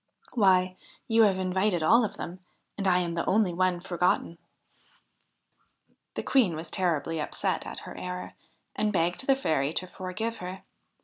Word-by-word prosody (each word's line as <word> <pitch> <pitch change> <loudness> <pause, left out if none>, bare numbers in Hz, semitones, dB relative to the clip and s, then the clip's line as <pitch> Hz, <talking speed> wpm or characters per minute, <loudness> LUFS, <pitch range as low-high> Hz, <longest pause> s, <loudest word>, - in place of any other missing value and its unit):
Why, 185 -4 +3 0.3
you 225 0 +4
have 195 -2 +2
invited 185 -1 +1
all 235 +9 +5
of 215 - -3
them, 180 +2 -6 0.4
and 195 -1 -2
I 180 -1 +5
am 175 -2 0
the 170 - -1
only 200 -3 +3
one 180 0 +1
forgotten.' 175 -1 0 1.8
The - - -3
Queen 225 -12 +3
was 160 +2 -7
terribly 165 -4 0
upset - - -1
at - - -6
her - - -9
error, 180 0 -6 0.4
and 215 0 +1
begged 175 +6 0
the 270 - +5
Fairy 155 - 0
to 185 - -2
forgive 190 +5 -4
her. 180 +1 -7
185 Hz, 160 wpm, -28 LUFS, 175-200 Hz, 1.8 s, all